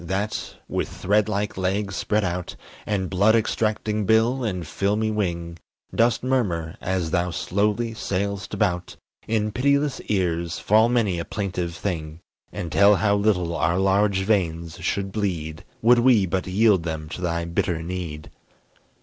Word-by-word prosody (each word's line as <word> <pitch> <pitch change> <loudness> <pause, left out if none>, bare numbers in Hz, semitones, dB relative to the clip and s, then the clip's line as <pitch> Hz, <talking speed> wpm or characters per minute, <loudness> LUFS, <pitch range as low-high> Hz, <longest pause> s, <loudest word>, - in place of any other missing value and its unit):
that, 100 +5 -3
with - - -2
thread 105 +2 +1
like 105 0 -2
legs 95 +1 -1
spread 105 +2 0
out, 90 -1 -3 0.3
And 100 -3 0
blood 100 +5 +3
extracting 110 -2 0
bill, 115 +4 +3
and 90 -6 -2
filmy 105 +7 0
wing, 85 -5 -3 0.3
Dost 115 0 +2
murmur, 95 -12 0
as 90 -3 -1
thou 90 0 +1
slowly 105 +6 0
sail'st 100 -1 -3
about, 90 -4 -1 0.3
In 110 -1 0
pitiless 140 +3 +1
ears, 85 -4 0
fall 110 +3 +4
many 110 -8 +1
a - - -2
plaintive 90 -4 -3
thing, 80 -5 -4 0.3
And 85 -2 -5
tell 100 +7 +6
how 100 +2 +2
little 95 -5 +1
our 85 +1 +1
large 95 0 +2
veins 85 -5 -1
should 95 +2 -1
bleed 85 -7 -3 0.2
Would 120 +1 +6
we 120 -5 +5
but 95 +1 -2
yield 100 0 +3
them 80 -2 -4
to 90 - -7
thy 85 -1 -1
bitter 85 0 -1
need. 85 -4 -6
95 Hz, 150 wpm, -24 LUFS, 85-105 Hz, 0.3 s, tell